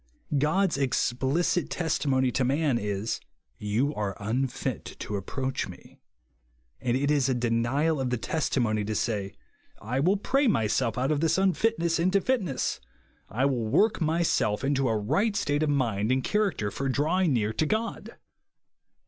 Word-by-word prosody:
God's 160 +2 +1
explicit 135 +6 0
testimony 135 -6 0
to 130 - 0
man 140 -1 +1
is, 105 +1 -2 0.2
" - - -46 0.2
You 140 +6 +2
are 105 -5 -3
unfit 120 +5 -2
to 105 - -5
approach 130 +7 -3
me - - -13 0.4
;" - - -41
and 125 0 +1
it 140 +2 +1
is 140 -3 +2
a 130 - +1
de 120 -1 -1
nial 135 +6 +1
of 130 - -1
the 125 - 0
testimony 115 -6 0
to 110 +1 -3
say, 100 -3 -2 0.2
" - - -37
I 120 +6 -2
will 185 +8 +3
pray 270 +7 +1
myself 110 - +1
out 130 +4 +1
of 150 - +1
this 165 +2 +2
unfitness 190 -3 +1
into 185 +3 +3
fitness; 195 - -1 0.5
I 125 +6 0
will 125 -5 0
work 210 - +2
myself 160 -9 +1
into 135 -2 +1
a 110 - +1
right 175 - 0
state 145 -7 0
of 155 - +1
mind 115 -6 0
and 130 0 +1
character 200 - 0
for 135 +6 -2
drawing 160 +6 +1
near 110 -3 0
to 155 - 0
God." 220 +4 -3
135 Hz, 165 wpm, -27 LUFS, 115-165 Hz, 0.5 s, will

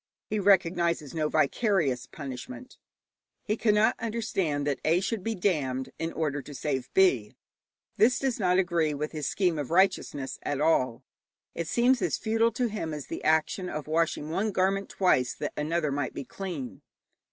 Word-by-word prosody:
He 215 - +1
recognizes 170 -6 +2
no 155 -2 0
vicarious 155 - +1
punishment. 145 - -8 0.6
He 215 - 0
cannot 215 -1 +3
understand 205 -10 -1
that 140 -3 -1
A. 165 +3 +3
should 200 +1 -2
be 225 +1 -1
damned 140 -9 -1
in 165 0 -2
order 145 -3 -1
to 145 +1 -10
save 130 -1 -3
B. 135 - +3 0.6
This 245 +4 +4
does 265 -4 -1
not 180 -2 +3
agree 170 -5 +1
with 150 +2 -3
his 150 -3 -3
scheme 180 -5 +1
of 145 - -4
righteousness 175 -6 +1
at 145 -1 -2
all. 130 -6 +2 0.5
It 170 - -4
seems 245 +4 +3
as - - 0
futile 225 +1 +2
to 245 +2 0
him 165 -8 -4
as 150 - -6
the - - -5
action 160 +4 +1
of 150 -1 -4
washing 155 -1 0
one 205 +6 0
garment 195 +1 0
twice 130 -10 +2
that 150 - -4
another 155 0 -1
might 140 -1 -2
be 140 - -5
clean. 170 -9 -6
165 Hz, 165 wpm, -28 LUFS, 145-200 Hz, 0.6 s, This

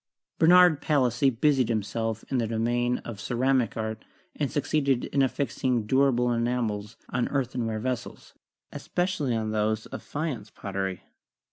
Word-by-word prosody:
Bernard 175 -2 +6
Palissy 135 -3 +2
busied 130 0 +2
himself 110 0 -2
in 130 - +1
the 115 - 0
domain 120 +2 0
of 115 -3 -6
the - - -9
ceramic 125 -1 +1
art, 110 0 -4 0.3
and 145 -3 -1
succeeded 140 -3 +1
in 140 - 0
affixing 130 -3 0
durable 125 0 +3
enamels 115 -3 -2
on 120 -1 0
earthenware 125 -5 -2
vessels, 125 +2 -5 0.4
especially 175 -9 -1
on 110 -1 -2
those 110 0 0
of - - -7
faience 145 -9 -4
pot 100 - -8
tery. 95 -2 -2
120 Hz, 140 wpm, -27 LUFS, 110-135 Hz, 0.4 s, Bernard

